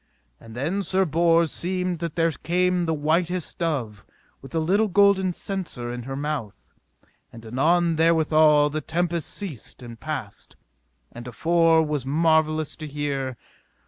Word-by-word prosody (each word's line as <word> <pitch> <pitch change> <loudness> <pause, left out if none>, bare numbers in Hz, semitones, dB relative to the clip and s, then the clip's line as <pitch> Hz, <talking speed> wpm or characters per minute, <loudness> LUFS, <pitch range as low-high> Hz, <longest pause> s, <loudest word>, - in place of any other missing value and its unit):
And 115 -1 -13
then 160 +11 -1
Sir 190 0 +1
Bors 165 0 +3
seemed 180 -1 -2
that 170 -2 -4
there 165 -1 +2
came 180 +2 0
the 160 - +1
whitest 165 +3 -1
dove 125 - -2 0.4
with 135 +3 -10
a - - +2
little 195 +7 +2
golden 200 -1 +3
censer 170 -11 -5
in 120 - -5
her 135 - -3
mouth. 135 - -5 0.6
And 115 0 -12
anon 165 +8 +1
therewithal 155 -2 +4
the 155 +1 -3
tempest 170 +1 -2
ceased 155 - -7
and 115 -1 -10
passed, 140 -10 -6 0.6
that 120 +1 -10
afore 165 +6 +3
was 150 -3 -2
marvellous 155 +1 +1
to 155 - -7
hear. 140 -3 -3
160 Hz, 145 wpm, -24 LUFS, 140-175 Hz, 0.6 s, therewithal